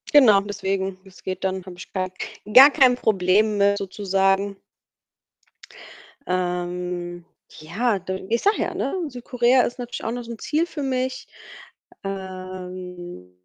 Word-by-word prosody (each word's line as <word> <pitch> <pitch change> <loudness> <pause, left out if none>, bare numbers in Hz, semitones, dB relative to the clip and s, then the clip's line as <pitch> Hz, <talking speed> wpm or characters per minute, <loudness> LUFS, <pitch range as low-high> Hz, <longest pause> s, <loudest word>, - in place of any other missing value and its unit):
Genau, 220 -8 +8
deswegen, 195 -2 -3
das 190 -1 -17
geht 185 0 -4
dann, 190 -1 -2
habe 185 - -9
ich 180 - -11
kein 185 -1 -2 0.4
gar 270 +3 +11
kein 255 -4 +5
Problem 210 0 +2
mit 200 0 +3
sozusagen. 195 0 0 1.7
Ähm, 180 -1 -3 0.4
ja, 200 +7 0
du, 190 +1 -4
ich 235 - +1
sage 410 +2 +3
ja, - - -3
ne, 275 - -2 0.2
Südkorea 250 0 +2
ist 240 +1 -2
natürlich 245 -1 -6
auch 225 - -2
noch 245 0 -4
so 235 - -9
'n 225 - -8
Ziel 315 +3 0
für 315 -4 -7
mich. 260 -1 -2 0.8
Ähm, 185 - -7
195 Hz, 140 wpm, -23 LUFS, 185-240 Hz, 1.7 s, gar